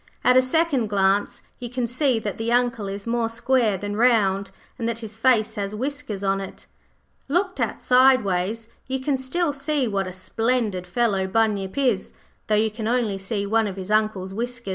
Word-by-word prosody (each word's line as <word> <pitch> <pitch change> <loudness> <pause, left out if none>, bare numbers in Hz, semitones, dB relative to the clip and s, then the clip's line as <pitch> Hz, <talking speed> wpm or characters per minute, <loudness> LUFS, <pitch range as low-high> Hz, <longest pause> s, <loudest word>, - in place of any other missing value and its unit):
At 250 - +5
a 255 - +7
second 270 -3 +1
glance 200 0 +1 0.2
you 245 -2 -6
can 250 0 -2
see 255 +1 +1
that 210 -2 -4
the 225 +1 -1
Uncle 240 -4 +1
is 200 +1 -6
more 230 -1 0
square 230 -3 +1
than 205 +2 -4
round, 205 -4 +2 0.3
and 230 0 -1
that 230 - -2
his 220 -2 -7
face 225 -2 +2
has 200 +1 -4
whiskers 265 -4 -4
on 195 0 +1
it. 195 - -9 0.6
Looked 365 +6 0
at - - -2
sideways 225 -5 +3 0.2
you 265 0 -2
can 270 +2 0
still 295 +4 0
see 280 -1 -1
what 195 -3 -1
a - - -5
splendid 210 0 -1
fellow 195 -1 +1
Bunyip 205 0 0
is, 250 -8 0 0.3
though 215 - +2
you 215 +1 +2
can 220 0 -5
only 230 -5 0
see 200 +1 -3
one 220 +1 +2
of 195 -1 -6
his 190 +2 -6
Uncle's 215 -3 0
whiskers. 235 0 -4
225 Hz, 185 wpm, -23 LUFS, 200-250 Hz, 0.6 s, a